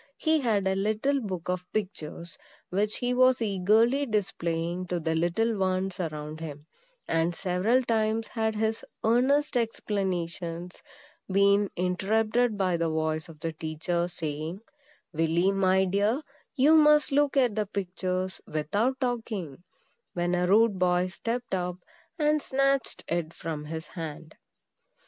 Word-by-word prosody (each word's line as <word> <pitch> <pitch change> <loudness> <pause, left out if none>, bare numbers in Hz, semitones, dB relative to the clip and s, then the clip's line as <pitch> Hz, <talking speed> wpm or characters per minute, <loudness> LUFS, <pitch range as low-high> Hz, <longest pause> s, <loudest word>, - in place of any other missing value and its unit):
He 315 0 +2
had 215 -7 +1
a 190 - +2
little 215 +8 0
book 185 -6 -5
of 180 0 -1
pictures, 175 -5 -4 0.4
which 205 +3 0
he 245 0 0
was 255 0 +4
eagerly 225 +6 +2
displaying 180 -4 -2
to 175 0 -1
the 160 0 -1
little 175 +8 +1
ones 190 0 0
around 155 -2 -4
him; 150 -2 -7 0.4
and 165 +1 +1
several 195 +9 +1
times 225 -1 0
had 220 -2 -1
his 220 +1 -1 0.2
earnest 270 +6 +3
explanations 180 -6 -2 0.5
been 200 +1 +4
interrupted 215 +5 +1
by 185 -3 +1
the 165 -1 0
voice 155 +1 -1
of 155 -2 -13
the 165 -1 -2
teacher, 160 +3 -2
saying, 160 +1 -5 0.5
"Willy, 165 +4 +2
my 190 -1 +3
dear, 205 - +1 0.3
you 290 +3 +5
must 300 -1 +5
look 285 0 +2
at 250 -5 +4
the 210 -1 -1
pictures 185 -1 -3
without 205 - 0
talking;" 220 - -3 0.5
when 175 0 0
a 180 0 +1
rude 210 0 +4
boy 180 0 +2
stepped 230 +6 -4
up 180 -1 -1 0.4
and 300 -1 +2
snatched 275 -1 0
it 170 -1 -2
from 155 -2 -5
his 160 +1 -5
hand. 160 -1 -8
190 Hz, 135 wpm, -28 LUFS, 170-225 Hz, 0.5 s, you